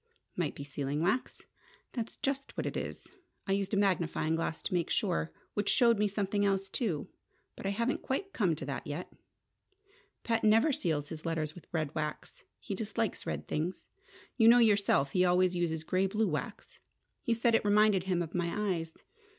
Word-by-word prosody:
"Might 170 Hz, -5 st, -1 dB
be 140 Hz, -, -6 dB
sealing 140 Hz, +1 st, -3 dB
wax." 205 Hz, +9 st, 0 dB, 0.5 s
"That's 230 Hz, -2 st, -4 dB
just 275 Hz, -1 st, -3 dB
what -, -, -1 dB
it -, -, -3 dB
is. -, -, -5 dB, 0.4 s
I -, -, -2 dB
used 195 Hz, 0 st, 0 dB
a 205 Hz, -, +1 dB
magnifying 175 Hz, -5 st, +1 dB
glass 165 Hz, -1 st, -2 dB
to -, -, -3 dB
make 175 Hz, -2 st, +1 dB
sure. 80 Hz, 0 st, 0 dB, 0.2 s
Which 205 Hz, -1 st, 0 dB
showed 235 Hz, -4 st, +4 dB
me 210 Hz, -, +3 dB
something 205 Hz, 0 st, 0 dB
else, 195 Hz, -1 st, 0 dB
too. 190 Hz, -, -1 dB, 0.5 s
But -, -, -5 dB
I -, -, +1 dB
haven't 230 Hz, +6 st, 0 dB
quite 390 Hz, +9 st, -3 dB
come 185 Hz, -8 st, +2 dB
to 140 Hz, -, -6 dB
that 135 Hz, 0 st, -5 dB
yet! 150 Hz, +5 st, -5 dB, 1.1 s
Pat 230 Hz, -1 st, 0 dB
never 225 Hz, +8 st, +5 dB
seals 150 Hz, -, -1 dB
his 155 Hz, -1 st, -7 dB
letters 160 Hz, -2 st, -2 dB
with 175 Hz, -, -13 dB
red 155 Hz, -3 st, -1 dB
wax. 150 Hz, -1 st, -5 dB, 0.2 s
He -, -, -5 dB
dislikes -, -, -2 dB
red -, -, -3 dB
things: 165 Hz, +5 st, -3 dB, 0.5 s
you 225 Hz, -2 st, +6 dB
know 235 Hz, +1 st, +9 dB
yourself 200 Hz, -, +4 dB
he 180 Hz, -, +3 dB
always 180 Hz, 0 st, +3 dB
uses 160 Hz, -2 st, -1 dB
grey 185 Hz, +4 st, +1 dB
blue 215 Hz, +3 st, +1 dB
wax. 200 Hz, +8 st, -5 dB, 0.4 s
He 230 Hz, -, +1 dB
said 230 Hz, +1 st, +2 dB
it 225 Hz, -, +4 dB
reminded 205 Hz, -2 st, +4 dB
him 180 Hz, -2 st, +1 dB
of 165 Hz, -, -8 dB
my 180 Hz, +3 st, 0 dB
eyes! 165 Hz, 0 st, -8 dB
190 Hz, 185 wpm, -31 LUFS, 160-215 Hz, 1.1 s, know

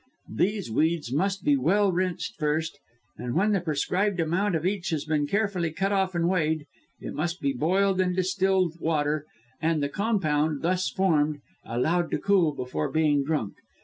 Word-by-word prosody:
These 200 Hz, -, 0 dB
weeds 155 Hz, 0 st, 0 dB
must 195 Hz, +5 st, 0 dB
be 145 Hz, -, +4 dB
well 190 Hz, +9 st, +2 dB
rinsed 180 Hz, -2 st, -2 dB
first; 155 Hz, +1 st, -1 dB, 0.4 s
and 120 Hz, -1 st, -4 dB
when 205 Hz, +5 st, +3 dB
the 195 Hz, -3 st, +1 dB
prescribed 180 Hz, +5 st, 0 dB
amount 175 Hz, +4 st, +1 dB
of 160 Hz, +1 st, -2 dB
each 190 Hz, -1 st, -1 dB
has 155 Hz, -3 st, -2 dB
been 150 Hz, -2 st, 0 dB
carefully 200 Hz, -3 st, 0 dB
cut 195 Hz, +5 st, -1 dB
off 190 Hz, -2 st, +1 dB
and 170 Hz, 0 st, +1 dB
weighed, 160 Hz, -4 st, 0 dB, 0.3 s
it -, -, -6 dB
must 170 Hz, +4 st, -2 dB
be 140 Hz, -4 st, 0 dB
boiled 185 Hz, +7 st, +2 dB
in 185 Hz, -, +1 dB
the 180 Hz, -, -2 dB
distilled 185 Hz, -2 st, +1 dB
water, 150 Hz, -2 st, 0 dB, 0.3 s
and 160 Hz, -2 st, +1 dB
the 140 Hz, -, 0 dB
compound, 155 Hz, -7 st, 0 dB
thus 180 Hz, +2 st, +1 dB
formed, 155 Hz, -6 st, +1 dB, 0.2 s
allowed 165 Hz, +9 st, 0 dB
to -, -, 0 dB
cool 195 Hz, -6 st, +3 dB
before 125 Hz, -, -3 dB
being 150 Hz, -3 st, +2 dB
drunk. 140 Hz, -8 st, -2 dB
170 Hz, 175 wpm, -26 LUFS, 150-190 Hz, 0.4 s, be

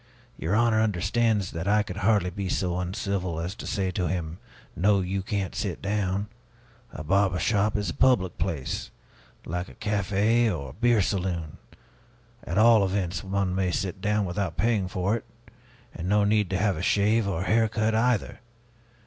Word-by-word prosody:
Your 85 Hz, +6 st, -1 dB
honor 115 Hz, -1 st, +3 dB
understands 105 Hz, 0 st, +1 dB
that 80 Hz, +2 st, -4 dB
I 105 Hz, +1 st, +3 dB
could 90 Hz, -2 st, -7 dB
hardly 100 Hz, -3 st, +2 dB
be 100 Hz, -1 st, -4 dB
so 90 Hz, -1 st, -1 dB
uncivil 90 Hz, -1 st, -2 dB
as 85 Hz, +3 st, -3 dB
to -, -, -8 dB
say 95 Hz, -2 st, -1 dB
to 90 Hz, -1 st, -1 dB
him, 85 Hz, 0 st, -3 dB, 0.4 s
'No, 100 Hz, +2 st, +3 dB
you 95 Hz, +1 st, -2 dB
can't 100 Hz, -1 st, -3 dB
sit -, -, -3 dB
down.' 100 Hz, 0 st, -1 dB, 0.6 s
A 80 Hz, -, -7 dB
barber 95 Hz, +3 st, +2 dB
shop 105 Hz, +2 st, +1 dB
is 105 Hz, -, -2 dB
a -, -, -6 dB
public 95 Hz, -9 st, +2 dB
place, 70 Hz, -6 st, -3 dB, 0.6 s
like 90 Hz, +2 st, -4 dB
a -, -, -14 dB
café 105 Hz, +3 st, +1 dB
or 70 Hz, -7 st, -5 dB
a -, -, -14 dB
beer 120 Hz, -2 st, +3 dB
saloon. 90 Hz, -5 st, -2 dB, 0.8 s
At 85 Hz, -, -4 dB
all 110 Hz, -1 st, +6 dB
events, 95 Hz, -2 st, -1 dB
one 95 Hz, -1 st, -1 dB
may 95 Hz, -1 st, 0 dB
sit 95 Hz, +1 st, -3 dB
down 105 Hz, +1 st, +1 dB
without 90 Hz, -2 st, -3 dB
paying 110 Hz, -5 st, +1 dB
for 95 Hz, +3 st, 0 dB
it, -, -, -11 dB, 0.7 s
and 90 Hz, +2 st, -5 dB
no 105 Hz, 0 st, +4 dB
need 105 Hz, -2 st, +2 dB
to 95 Hz, -, 0 dB
have 100 Hz, -2 st, +1 dB
a -, -, -4 dB
shave 105 Hz, +3 st, +2 dB
or 95 Hz, -3 st, -1 dB
hair 110 Hz, +2 st, +2 dB
cut, 110 Hz, 0 st, 0 dB
either! 115 Hz, 0 st, +1 dB
100 Hz, 175 wpm, -26 LUFS, 90-105 Hz, 0.8 s, all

